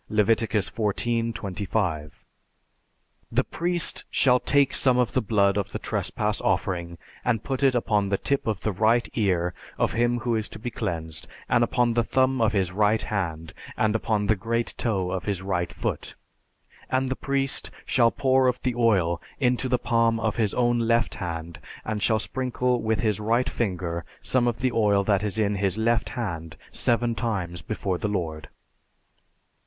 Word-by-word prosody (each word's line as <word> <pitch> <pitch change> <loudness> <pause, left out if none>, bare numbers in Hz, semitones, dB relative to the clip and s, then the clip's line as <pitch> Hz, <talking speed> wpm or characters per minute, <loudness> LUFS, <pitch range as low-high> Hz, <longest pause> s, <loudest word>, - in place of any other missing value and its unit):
(Leviticus 110 0 +2
XIV, 115 +2 0
25.) 90 -6 -3 1.1
"The - - +2
priest 175 0 -1
shall 125 -2 +4
take 140 0 +2
some 130 -2 +4
of 125 -4 +1
the - - +2
blood 100 -2 +2
of 100 -1 -2
the - - -1
trespass 105 0 -2
offering 85 -2 -1 0.3
and 115 -3 0
put 135 -1 -3
it 135 -2 +4
upon 105 -4 +1
the 100 - +1
tip 140 +3 -1
of 105 -5 -1
the 110 - 0
right 110 +5 +2
ear 90 -5 +1 0.2
of - - +1
him 120 +1 +2
who 120 -2 0
is 110 -1 -1
to - - -8
be 120 +3 -5
cleansed 80 -5 -4 0.2
and 120 - +3
upon 120 0 +2
the 120 0 +2
thumb 130 +1 +1
of 110 - +3
his 95 -4 0
right 105 +3 +2
hand, 80 -6 -3 0.2
and 110 -1 +2
upon 110 -2 0
the 110 +2 +3
great 115 +4 -2
toe 95 -6 -1
of 95 - -3
his 100 -3 -2
right 90 -3 -1
foot, - - -4 0.7
and 130 +1 +1
the - - 0
priest 135 0 0 0.2
shall 120 -3 +4
pour 130 0 +2
of 125 0 +1
the 125 - 0
oil 95 -8 +2 0.2
into 125 0 +1
the 125 - +3
palm 115 -1 +2
of 110 -2 -1
his 110 -4 +1
own 120 -1 +2
left 115 0 +2
hand 85 -2 -5 0.3
and 110 -1 -2
shall 110 +2 +3
sprinkle 125 +1 -1
with 110 0 0
his 105 -2 +1
right 115 +4 +1
finger 90 -6 -2 0.2
some 125 -2 +2
of 120 - -1
the 130 -1 +2
oil 105 -3 +3
that 100 -1 +2
is 105 0 -2
in 105 -2 +1
his 95 0 0
left 115 +1 +1
hand 85 -9 -4
seven 120 0 +1
times 95 -8 -3
before 95 -1 -3
the - - -1
Lord." 80 -6 -3
110 Hz, 175 wpm, -25 LUFS, 95-120 Hz, 1.1 s, shall